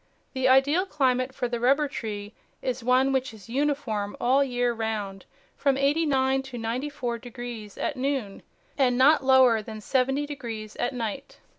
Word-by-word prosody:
The 260 Hz, 0 st, +1 dB
ideal 285 Hz, +8 st, +4 dB
climate 255 Hz, -4 st, +1 dB
for 255 Hz, -1 st, -3 dB
the 240 Hz, -1 st, -3 dB
rubber 275 Hz, +5 st, +3 dB
tree 210 Hz, -5 st, -6 dB, 0.3 s
is 255 Hz, -1 st, -2 dB
one 255 Hz, +2 st, +3 dB
which 260 Hz, -3 st, -1 dB
is 215 Hz, +1 st, -15 dB
uniform 255 Hz, -6 st, -1 dB
all 260 Hz, +3 st, +3 dB
the 280 Hz, -, +2 dB
year 245 Hz, -1 st, 0 dB
round, 215 Hz, -4 st, -4 dB, 0.3 s
from 275 Hz, -2 st, +1 dB
eighty 290 Hz, +4 st, +2 dB
nine 265 Hz, -1 st, +2 dB
to 265 Hz, -2 st, -9 dB
ninety 235 Hz, +5 st, -3 dB
four 245 Hz, -5 st, -4 dB
degrees 240 Hz, -3 st, -8 dB
at 295 Hz, -, -2 dB
noon, 260 Hz, -6 st, -2 dB, 0.4 s
and 250 Hz, -2 st, +3 dB
riot 285 Hz, +2 st, +5 dB
lower 260 Hz, -4 st, +5 dB
than 215 Hz, 0 st, -8 dB
seventy 270 Hz, +5 st, 0 dB
degrees 230 Hz, -7 st, -7 dB
at 245 Hz, -, -1 dB
night. 235 Hz, +3 st, -5 dB
255 Hz, 170 wpm, -26 LUFS, 230-270 Hz, 0.4 s, riot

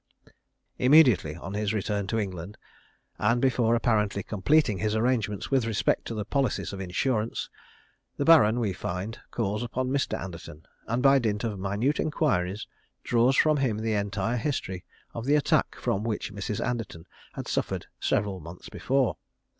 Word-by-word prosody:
Immediately 125 Hz, -, +5 dB
on 90 Hz, +3 st, -7 dB
his 105 Hz, 0 st, -1 dB
return 100 Hz, -1 st, -1 dB
to 110 Hz, -, -1 dB
England, 95 Hz, -1 st, -4 dB, 0.6 s
and 115 Hz, +3 st, +2 dB
before 120 Hz, -3 st, +2 dB
apparently 105 Hz, -4 st, +1 dB
completing 110 Hz, 0 st, +2 dB
his 105 Hz, +2 st, 0 dB
arrangements 110 Hz, -3 st, 0 dB
with 135 Hz, -3 st, +3 dB
respect 100 Hz, -4 st, 0 dB
to 115 Hz, -, -5 dB
the 105 Hz, -1 st, -3 dB
policies 135 Hz, -3 st, -1 dB
of 95 Hz, -, -5 dB
insurance, 110 Hz, +5 st, -1 dB, 0.7 s
the 140 Hz, -, -1 dB
Baron, 125 Hz, -9 st, +6 dB
we 105 Hz, -5 st, 0 dB
find, 90 Hz, +5 st, -5 dB
calls 105 Hz, -2 st, -2 dB
upon 125 Hz, +2 st, -2 dB
Mr. 140 Hz, 0 st, 0 dB
Anderton, 85 Hz, -4 st, -9 dB, 0.2 s
and 120 Hz, +3 st, -1 dB
by 135 Hz, 0 st, +6 dB
dint 105 Hz, -4 st, -1 dB
of 105 Hz, -4 st, -3 dB
minute 100 Hz, +9 st, 0 dB
inquiries 110 Hz, -, 0 dB, 0.4 s
draws 120 Hz, +3 st, +3 dB
from 155 Hz, +2 st, +4 dB
him 130 Hz, -6 st, 0 dB
the 110 Hz, 0 st, -1 dB
entire 100 Hz, +3 st, -1 dB
history 110 Hz, -, -3 dB, 0.3 s
of 115 Hz, 0 st, -5 dB
the 145 Hz, +2 st, +3 dB
attack 150 Hz, -, +2 dB
from 100 Hz, -, -1 dB
which 110 Hz, -2 st, -3 dB
Mrs. 100 Hz, +1 st, -3 dB
Anderton 115 Hz, -9 st, -4 dB, 0.3 s
had -, -, -6 dB
suffered -, -, -2 dB
several 100 Hz, -2 st, 0 dB
months 85 Hz, +2 st, -10 dB
before. 135 Hz, -2 st, 0 dB
110 Hz, 155 wpm, -27 LUFS, 100-125 Hz, 0.7 s, Baron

